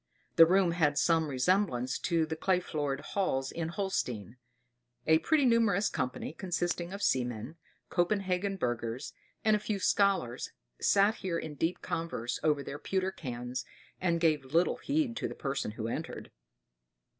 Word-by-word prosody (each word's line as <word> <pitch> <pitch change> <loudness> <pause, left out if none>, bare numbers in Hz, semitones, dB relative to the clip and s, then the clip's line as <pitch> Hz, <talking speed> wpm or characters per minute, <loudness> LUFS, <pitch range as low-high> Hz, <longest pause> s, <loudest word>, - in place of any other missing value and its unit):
The 165 - +9
room 185 0 +4
had 150 -4 +2
some 160 +1 +3
resemblance 130 -2 +1
to 165 -2 +1
the 160 0 -4
clay 180 +3 +2
floored 145 -5 -2
halls 135 -9 -1
in 165 -1 -3
Holstein; 130 - -3 0.7
a 160 0 +5
pretty 310 - +3
numerous 220 -4 +3
company, 130 +4 -3
consisting 175 -1 -2
of 200 +1 -5
seamen, 125 +2 0 0.3
Copenhagen 195 +1 0
burghers, 120 -2 -3 0.3
and 215 -1 +5
a - - 0
few 210 0 -2
scholars, 190 - +1 0.3
sat 205 +2 +4
here 180 -3 -2
in 155 -2 -5
deep 165 +4 -2
converse 125 -8 -3
over 150 -2 +2
their 145 - -6
pewter 190 +3 -1
cans, 125 -4 -5 0.4
and 170 -2 +1
gave 155 -4 +2
little 165 +7 +2
heed 285 -5 0
to - - -1
the - - -7
person 135 -3 -2
who 110 0 -4
entered. 115 - -5
165 Hz, 150 wpm, -31 LUFS, 135-190 Hz, 0.7 s, The